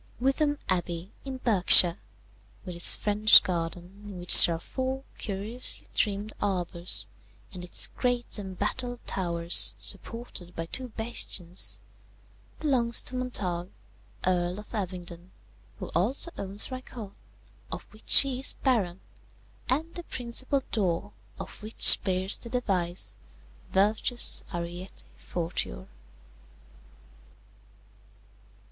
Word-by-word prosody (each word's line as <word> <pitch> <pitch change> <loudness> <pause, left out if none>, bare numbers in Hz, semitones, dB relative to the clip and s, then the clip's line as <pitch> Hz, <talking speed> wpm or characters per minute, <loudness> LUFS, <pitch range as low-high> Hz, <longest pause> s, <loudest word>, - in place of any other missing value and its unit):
"Wytham 290 +3 0
Abbey, 175 0 -3
in 265 -1 -6
Berkshire, 185 -6 +6 0.7
with 180 -2 -7
its 170 - +8
French 210 0 +5
garden 175 +2 -6
in 200 -3 -9
which 175 0 +9
there 170 - -2
are - - -7
four 260 +7 -5 0.2
curiously 210 +5 -2
trimmed 210 0 -2
arbours, 175 - -1 0.5
and 180 -2 -7
its 175 - 0
great 245 -3 -2
embattled 240 +6 -4
towers, 170 -2 +3
supported 230 -7 -4
by 165 - -5
two 255 +9 -3
bastions, 210 -6 -1 0.8
belongs 245 -6 0
to 255 - -5
Montague, 185 -9 -4 0.6
Earl 180 0 -1
of 210 - -14
Abingdon, 180 -3 -7 0.5
who - - -8
also 235 - 0
owns 200 +5 -5
Rycote, 245 -5 -9 0.6
of - - -6
which 215 - +6
he 270 -2 0
is 270 - 0
Baron, 195 -9 -2 0.7
and 315 +6 -2
the 350 - -7
principal 260 +3 -2
door 195 -2 -2 0.2
of - - -10
which 215 +1 +6
bears 190 +1 -1
the 235 - -7
device 190 -8 -2 0.5
Virtus 215 +5 +1
ariete 175 +1 -8
fortior. 165 - -5
200 Hz, 110 wpm, -26 LUFS, 175-245 Hz, 0.8 s, which